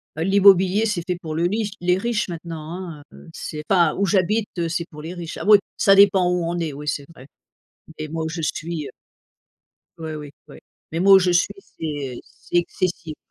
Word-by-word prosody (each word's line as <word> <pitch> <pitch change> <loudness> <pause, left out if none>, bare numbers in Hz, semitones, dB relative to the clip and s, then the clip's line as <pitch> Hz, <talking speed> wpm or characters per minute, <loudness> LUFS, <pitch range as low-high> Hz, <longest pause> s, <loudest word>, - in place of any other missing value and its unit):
bah, 160 - -2
l'immobilier 195 +1 +5
c'est 195 -6 -1
fait 180 -1 -1
pour 160 -3 -6
le 165 +2 0
riche 215 +1 -2
les 180 +1 +2
riches 235 +2 -1
maintenant, 170 +1 -6
hein, 150 -2 -11
heu. - - -14
C'est 150 -2 -6
enfin 175 -5 +3
où 200 - +2
j'habite, 200 +3 +1
heu, 170 - -1
c'est 170 +1 -2
pour 150 0 -10
les 170 +4 -7
riches. 170 -2 -7
Ah - - -6
oui, 210 -1 +9 0.2
ça 195 -1 +5
dépend 195 -2 +5
où 180 -1 0
on 170 +1 -2
est, 165 -2 -2
oui, 150 +1 -9
c'est 145 -1 -2
vrai. 130 - -13 0.7
Mais 155 -1 -5
moi, 160 0 -3
où 160 - -3
je 165 0 -5
suis, 155 -1 -3
heu - - -9 1.1
Ouais, 160 -1 -5
oui, 150 -1 -8 0.2
ouais. - - -13 0.3
Mais 165 - -2
moi, 195 +2 +7
où 195 - +9
je 180 -1 +1
suis, 175 0 +2
c'est 145 - -6
c'est - - -7
excessif. 170 -2 -3
170 Hz, 215 wpm, -22 LUFS, 160-190 Hz, 1.1 s, oui